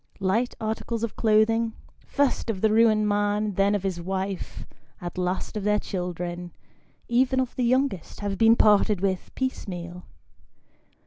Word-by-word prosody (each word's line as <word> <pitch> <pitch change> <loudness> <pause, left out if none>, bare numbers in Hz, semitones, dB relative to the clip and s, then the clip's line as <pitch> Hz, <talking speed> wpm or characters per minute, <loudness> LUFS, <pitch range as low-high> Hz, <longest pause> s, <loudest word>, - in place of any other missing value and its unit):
Light 210 +6 0
articles 225 +1 -3
of 230 - -3
clothing, 225 +1 +2 0.3
first 280 -4 0
of 195 -4 -2
the 220 - +3
ruined 215 -1 +4
man, 205 0 0
then 195 +2 +2
of 200 - -2
his 185 -3 -2
wife, 190 +1 -4 0.3
at 175 -1 -6
last 180 +4 -2
of 210 - -3
their 210 0 +3
children, 175 -2 -4 0.5
even 255 +2 +2
of 255 -2 -2
'the 250 - 0
youngest, 255 - 0
have 200 -1 -2
been 225 +3 +5
parted 210 -2 +4
with, 190 -1 -1
piecemeal. 180 -9 -5
210 Hz, 145 wpm, -25 LUFS, 185-225 Hz, 0.5 s, been